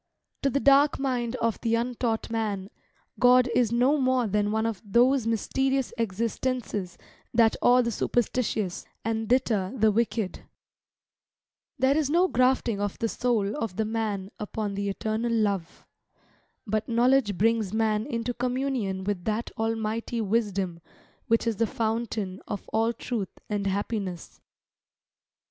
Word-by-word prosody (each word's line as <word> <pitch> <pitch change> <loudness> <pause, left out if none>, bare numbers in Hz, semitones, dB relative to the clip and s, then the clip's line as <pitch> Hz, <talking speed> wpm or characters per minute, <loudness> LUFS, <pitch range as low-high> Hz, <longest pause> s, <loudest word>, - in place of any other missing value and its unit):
To 275 - +2
the 280 - 0
dark 280 +1 +5
mind 250 -3 -1
of 230 -3 -1
the 230 -1 +1
untaught 235 -1 -1
man, 210 -4 -2 0.5
God 250 0 +6
is 235 -3 +2
no 250 +5 +3
more 255 -2 +2
than 205 0 0
one 220 +1 0
of 225 -4 -2
those 240 +4 +3
mysterious 265 +4 0
existences 225 -3 -2 0.4
that 225 -1 +5
awe 250 +1 +5
the 235 - -1
superstitious, 220 -4 -1 0.2
and 225 -1 -1
deter 225 -6 +1
the 220 -1 +4
wicked. 220 -2 -1 1.4
There 265 +1 +3
is 300 -2 +1
no 350 +4 +4
grafting 250 - +2
of 205 -1 -2
the 230 - 0
soul 225 -4 0
of 225 -10 -3
the 220 - 0
man 210 -3 -2
upon 210 -1 -3
the 200 0 -2
eternal 220 +4 -2
love. 200 -6 -1 0.8
But 215 +1 -2
knowledge 235 -3 +3
brings 220 -1 +2
man 220 +1 +1
into 235 -2 -2
communion 250 -6 -2
with 195 -2 -2
that 220 +2 -2
Almighty 225 +1 -2
wisdom 200 -5 -1 0.5
which 230 +1 +2
is 230 -3 0
the 230 - +2
fountain 220 -4 -2
of 205 - -5
all 225 +1 +1
truth 230 -4 -4 0.2
and 205 -1 -1
happiness. 195 -3 -3
225 Hz, 140 wpm, -27 LUFS, 205-245 Hz, 1.4 s, God